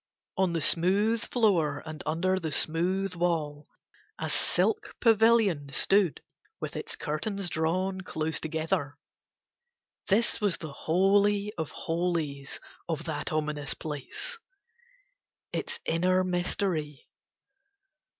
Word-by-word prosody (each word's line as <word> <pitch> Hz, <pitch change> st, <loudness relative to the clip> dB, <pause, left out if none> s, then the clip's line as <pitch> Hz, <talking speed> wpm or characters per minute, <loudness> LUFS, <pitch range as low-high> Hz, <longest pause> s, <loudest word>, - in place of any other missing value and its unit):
On 185 Hz, -2 st, +1 dB
the 165 Hz, -, 0 dB
smooth 200 Hz, +9 st, +3 dB
floor 200 Hz, -11 st, +2 dB
and 155 Hz, -1 st, -6 dB
under 185 Hz, +4 st, +1 dB
the 160 Hz, -3 st, -3 dB
smooth 180 Hz, +6 st, +1 dB
wall 160 Hz, -4 st, -1 dB, 0.5 s
a -, -, -3 dB
silk 425 Hz, -1 st, +1 dB
pavilion 220 Hz, -, +4 dB
stood 185 Hz, +3 st, +2 dB, 0.4 s
with -, -, -5 dB
its -, -, -3 dB
curtains 175 Hz, +4 st, -2 dB
drawn 185 Hz, +4 st, 0 dB
close 160 Hz, -3 st, -2 dB
together: 155 Hz, -3 st, -2 dB, 1.1 s
this 220 Hz, +3 st, +2 dB
was 205 Hz, -4 st, +1 dB
the 155 Hz, -4 st, -7 dB
holy 200 Hz, +6 st, +2 dB
of 160 Hz, -3 st, -3 dB
holies 165 Hz, -5 st, -2 dB, 0.3 s
of 160 Hz, -1 st, -2 dB
that 155 Hz, -3 st, -3 dB
ominous 150 Hz, -2 st, -1 dB
place, 155 Hz, -, -5 dB, 1.1 s
its 470 Hz, 0 st, -3 dB
inner 185 Hz, +3 st, +2 dB
mystery. 175 Hz, -4 st, -1 dB
175 Hz, 105 wpm, -29 LUFS, 155-195 Hz, 1.1 s, pavilion